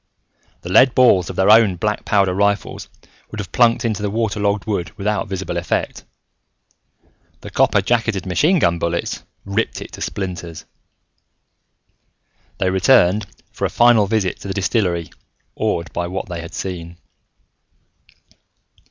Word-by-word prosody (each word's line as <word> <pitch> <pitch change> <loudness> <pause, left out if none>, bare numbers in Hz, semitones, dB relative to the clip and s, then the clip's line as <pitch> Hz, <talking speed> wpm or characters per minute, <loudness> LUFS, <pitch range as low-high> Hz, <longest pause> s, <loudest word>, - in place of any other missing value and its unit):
The 90 - -7
lead 130 +6 +5
balls 120 -8 +4
of - - -6
their 95 +2 +4
own 110 -4 +5
black 105 +4 -2
powder 100 -3 +2
rifles 100 +1 -1 0.4
would 110 - -8
have 95 - -6
plunked 120 0 +3
into 110 -3 -1
the 105 - -1
water 110 0 -2
logged 100 0 0
wood 90 -7 -2
without 105 +2 -1
visible 95 -2 -4
effect. 85 - -3 1.4
The - - -9
copper - - +3
jacketed 115 -5 0
machine 150 - +2
gun 85 - +1
bullets 85 0 -2 0.2
ripped 100 +3 -2
it - - -9
to - - -10
splinters. 90 -4 -5 1.9
They 95 - 0
returned 100 0 +3 0.2
for - - -3
a - - 0
final 120 -4 +4
visit 105 -4 -1
to - - -9
the 95 - -4
distillery 95 -4 -1 0.4
awed 85 0 -2
by 85 - -2
what 95 +2 -5
they 85 -2 -5
had 85 - -10
seen. 85 -2 -6
100 Hz, 145 wpm, -19 LUFS, 90-110 Hz, 1.9 s, lead